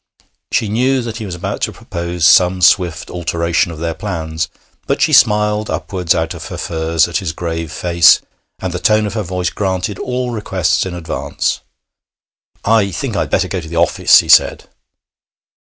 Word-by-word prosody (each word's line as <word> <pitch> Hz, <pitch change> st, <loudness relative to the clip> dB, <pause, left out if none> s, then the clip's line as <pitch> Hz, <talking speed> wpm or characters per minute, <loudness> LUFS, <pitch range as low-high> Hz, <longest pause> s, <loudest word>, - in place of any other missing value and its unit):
She 110 Hz, -, +1 dB
knew 125 Hz, +5 st, +1 dB
that 115 Hz, -1 st, -5 dB
he 110 Hz, -3 st, -6 dB
was 90 Hz, -, -5 dB
about 85 Hz, -, -5 dB
to -, -, -1 dB
propose 85 Hz, -1 st, -4 dB
some 90 Hz, +2 st, +5 dB
swift 90 Hz, -3 st, +2 dB
alteration 85 Hz, -1 st, -1 dB
of 80 Hz, -, -8 dB
their 85 Hz, +1 st, -3 dB
plans, 80 Hz, -3 st, -4 dB, 0.4 s
but -, -, 0 dB
she -, -, +2 dB
smiled 105 Hz, 0 st, +3 dB
upwards 90 Hz, -4 st, -1 dB
out 80 Hz, +1 st, -1 dB
of 85 Hz, -, -8 dB
her -, -, -7 dB
furs 80 Hz, -1 st, 0 dB
at 85 Hz, -2 st, -2 dB
his 90 Hz, -5 st, -3 dB
grave 80 Hz, -2 st, -4 dB
face, 85 Hz, -1 st, +4 dB, 0.4 s
and 95 Hz, -2 st, -5 dB
the 90 Hz, -, -3 dB
tone 110 Hz, +2 st, +2 dB
of 105 Hz, -, -4 dB
her 110 Hz, -, -2 dB
voice 90 Hz, -2 st, -3 dB
granted 95 Hz, 0 st, -2 dB
all 125 Hz, 0 st, -3 dB
requests 95 Hz, -6 st, -1 dB
in 90 Hz, -, -6 dB
advance. 85 Hz, -2 st, -3 dB, 1.1 s
'I 110 Hz, -2 st, +3 dB
think 85 Hz, -, -4 dB
I'd -, -, -1 dB
better -, -, +1 dB
go 95 Hz, -, -3 dB
to 80 Hz, -, -10 dB
the 85 Hz, -, -6 dB
office,' 85 Hz, 0 st, +4 dB
he -, -, -11 dB
said. -, -, +4 dB
90 Hz, 180 wpm, -16 LUFS, 85-105 Hz, 1.1 s, some